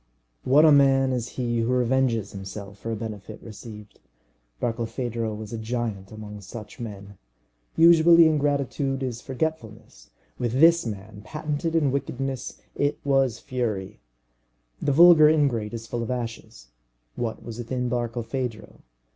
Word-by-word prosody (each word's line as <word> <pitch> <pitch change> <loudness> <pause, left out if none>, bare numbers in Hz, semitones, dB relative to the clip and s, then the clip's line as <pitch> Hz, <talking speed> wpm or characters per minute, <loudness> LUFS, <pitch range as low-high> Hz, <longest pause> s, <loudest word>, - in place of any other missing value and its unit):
What 145 +5 +5
a 155 - +7
man 135 -2 +5
is 120 -2 -2
he 120 -2 -1
who 115 +2 0
revenges 125 -4 +1
himself 100 +1 -8
for 115 - -5
a - - -1
benefit 110 -1 -7
received! 105 -1 -11 0.6
Barkilphedro 115 -1 -2
was 110 +1 -8
a 115 - -4
giant 110 -4 -4
among 105 -1 -9
such 105 +3 -10
men. 100 -3 -8 0.6
Usually, 170 0 +7
ingratitude 140 -2 0
is 120 -2 -4
forgetfulness. 130 -6 -5 0.3
With 120 -1 -1
this 165 -3 +5
man, 105 0 -7
patented 150 +4 -3
in 145 -5 +3
wickedness, 135 -1 -4
it 145 0 0
was 135 -4 +2
fury. 115 -8 -4 0.8
The - - +1
vulgar 160 0 +8
ingrate 135 -9 +1
is 115 0 -7
full 120 +1 -4
of 115 - -4
ashes; 115 - -6 0.5
what 115 -2 -4
was 115 0 -8
within 125 +1 -2
Barkilphedro? 120 -1 -4
120 Hz, 135 wpm, -25 LUFS, 110-135 Hz, 0.8 s, vulgar